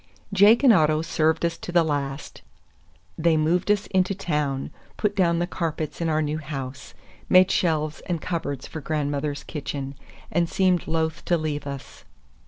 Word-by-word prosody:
Jake 205 +6 +6
and 255 -4 +8
Otto 155 -3 +3
served 160 0 +1
us 170 0 -2
to - - -6
the 175 -1 +4
last. 140 -2 -3 0.8
They 160 0 +3
moved 170 +5 +1
us 210 -1 +2
into 190 +1 +1
town, 150 -7 -2 0.3
put 210 -1 0
down 170 -3 +3
the 175 - +1
carpets 165 -3 -4
in 165 - 0
our 155 0 +1
new 150 +1 -2
house, 135 -2 -7 0.3
made 185 0 +6
shelves 155 -3 0
and 175 -2 -1
cupboards 155 -6 -3
for 155 - -7
grandmother's 145 -1 -2
kitchen, 140 -2 -5 0.4
and 170 +1 +1
seemed 185 -2 +2
loath 160 0 -1
to 175 - +2
leave 150 -2 -3
us. 140 -1 -8
160 Hz, 165 wpm, -24 LUFS, 150-175 Hz, 0.8 s, and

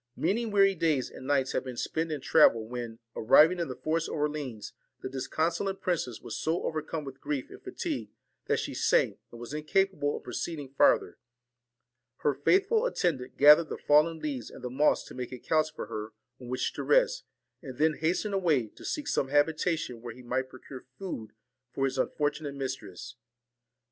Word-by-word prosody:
Many 215 +8 0
weary 195 -2 +4
days 160 -7 0
and 130 - -10
nights 135 -2 +2
had - - -1
been 130 -2 -7
spent 160 +5 -2
in 150 -3 -3
travel, 115 -9 +5
when, 120 -1 -6 0.2
arriving 160 +10 +5
in 170 - -1
the 130 - -5
forest 160 +6 -1
of - - -4
Orleans, 145 -8 -3 0.3
the - - -3
disconsolate 165 +8 -1
princess 155 -10 -2
was - - -6
so 165 +3 -1
overcome 155 0 -3
with 135 -1 -9
grief 145 -3 -3
and - - -12
fatigue, - - -4 0.4
that - - +2
she - - -3
sank, - - +2
and 120 - -12
was 120 +4 -8
incapable 155 0 0
of - - -11
proceeding 145 +3 -5
farther. - - +3 1.0
Her 145 - +2
faithful 395 - +3
attendant 155 - -1
gathered 150 +3 +7
the - - -4
fallen 155 +3 +4
leaves 140 -7 -4
and - - -12
the 125 - -4
moss 145 +4 +3
to - - -11
make 125 -1 -5
a 125 - -6
couch 155 +4 +1
for - - -6
her 110 0 -6 0.3
on 125 - -10
which 125 +1 -2
to - - -4
rest, - - +3 0.4
and 130 -7 -9
then 155 +2 +3
hastened 180 +6 0
away, 155 - +2
to - - -16
seek 295 -1 -3
some 135 - +1
habitation 150 -2 +1
where 120 -1 -7
he 125 - -13
might 130 +2 -2
procure 130 0 -11
food 145 - -6 0.5
for 135 - +1
his 135 -1 -2
unfortunate 145 -1 -1
mistress. 125 -4 -6
145 Hz, 185 wpm, -29 LUFS, 130-165 Hz, 1.0 s, gathered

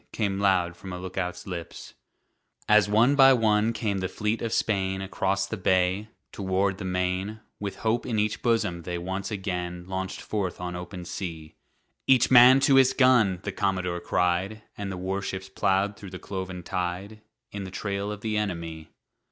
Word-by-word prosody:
Came 100 -3 -1
loud 90 -3 +2
from 95 +2 -9
a - - -4
lookout's 90 0 -4
lips. 85 -3 -7 0.7
As 105 -1 +5
one 115 +6 +4
by 135 -1 +7
one 110 -2 +3
came 105 -4 -2
the 95 - -1
fleet 105 +3 -2
of 115 - -2
Spain 95 -4 0
Across 95 0 -1
the 110 - -5
bay, 95 +2 +1 0.2
toward 95 0 -1
the - - -5
main, 90 +3 -2 0.2
With 100 -1 -4
hope 115 +3 +1
in 115 -3 -1
each 105 0 0
bosom 105 -7 +1
they 85 +1 -4
once 95 +3 -4
again 90 -4 -4
Launched 95 0 -4
forth 100 -4 -3
on 90 0 -4
open 90 0 -7
sea. 80 -4 -6 0.5
"Each 130 -2 +4
man 125 +1 +9
to 135 -1 +5
his 135 0 +5
gun!" 120 -9 +4
the - - -3
commodore 95 -3 -1
cried, 90 +5 0
And 100 -1 -5
the 95 - -5
warships 95 +1 -4
plowed 100 +1 0
through 100 -4 -9
the 90 - -7
cloven 95 -2 -6
tide, 90 +5 -4 0.3
In 100 -1 -5
the - - -6
trail 100 +1 -3
of 105 -1 -7
the 110 -1 -1
enemy. 85 -6 -4
95 Hz, 175 wpm, -26 LUFS, 90-105 Hz, 0.7 s, man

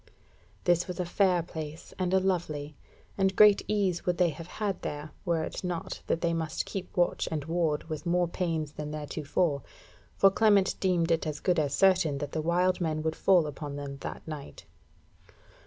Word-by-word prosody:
This 175 0 +2
was 180 -1 -6
a 180 - 0
fair 180 -1 +2
place 160 -2 -8
and 180 -1 0
a 190 - +5
lovely, 155 -6 -2 0.4
and 190 0 +2
great 210 0 +7
ease 195 -5 0
would 180 -1 0
they 180 -2 +4
have 165 +1 -8
had 200 0 -3
there, 150 +1 -5
were 165 -2 +1
it - - -5
not 175 -2 -4
that 165 - 0
they 170 -1 +1
must 160 -1 -2
keep 190 -2 -6
watch 175 - +1
and 150 -3 -2
ward 160 -2 0
with 160 +1 -6
more 175 0 +2
pains 165 -4 -2
than 150 0 -6
theretofore; 150 0 -1 0.5
for 195 - +6
Clement 205 -2 +4
deemed 175 -3 +1
it 165 -1 +1
as 150 -1 -3
good 180 -3 +2
as 145 -2 0
certain 180 -7 +3
that 145 0 -4
the 155 - -2
wild 180 +3 +1
men 155 -2 -1
would 160 0 -1
fall 180 -4 +4
upon 145 -1 -6
them 140 -1 -6
that - - -7
night. 150 -3 -8
170 Hz, 190 wpm, -29 LUFS, 155-180 Hz, 0.5 s, great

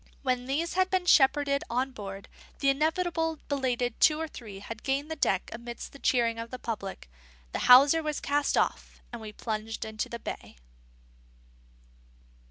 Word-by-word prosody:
When 255 -2 0
these 315 +5 -1
had 375 0 +2
been 370 -1 0
shepherded 280 -2 +4
on 255 +3 0
board, 200 -4 -8 0.3
and - - -30
the 275 - +3
inevitable 325 +2 0
belated 250 -4 -1
two 310 0 +5
or 320 - -2
three 220 -9 -10
had 220 +3 -8
gained 280 +3 -1
the - - -2
deck 195 -10 0
amidst 235 +1 -7
the 280 - -12
cheering 230 -4 +1
of 230 0 -6
the 255 - -6
public, 210 - -5 0.4
the - - -3
hawser 280 +6 +8
was 305 -2 -2
cast 290 0 0
off, - - -1
and 235 - -6
we 215 -1 -7
plunged 220 +1 -4
into 220 0 -4
the 235 - -5
bay. - - -7
260 Hz, 170 wpm, -28 LUFS, 230-300 Hz, 0.4 s, hawser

